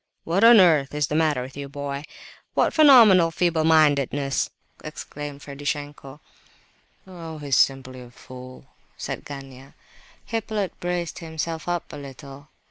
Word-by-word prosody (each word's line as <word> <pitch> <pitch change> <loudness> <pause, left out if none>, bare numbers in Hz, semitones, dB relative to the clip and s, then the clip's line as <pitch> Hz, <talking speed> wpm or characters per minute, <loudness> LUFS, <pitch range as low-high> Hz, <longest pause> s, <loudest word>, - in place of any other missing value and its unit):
"What 180 +6 0
on 230 -1 +8
earth 155 -6 +3
is 150 -1 +1
the 150 - -6
matter 155 -5 +1
with 130 +1 -10
the 140 - -7
boy? 140 +1 -6 0.5
What - - +2
phenomenal 230 - +7
feeble 165 -1 0
mindedness!" 145 -3 +2 0.3
exclaimed 145 -1 -8
Ferdishenko. 145 0 -6 0.9
"Oh, 165 -4 -9
he's 145 -3 -1
simply 130 -1 +1
a 125 - -12
fool," 130 +1 -13 0.3
said - - -6
Gania. 135 -1 -11 0.5
Hippolyte 220 -4 -4
braced 175 -1 -3
himself 160 -1 -5
up 175 -2 -3
a - - -7
little. 140 0 -11
145 Hz, 130 wpm, -23 LUFS, 140-170 Hz, 0.9 s, on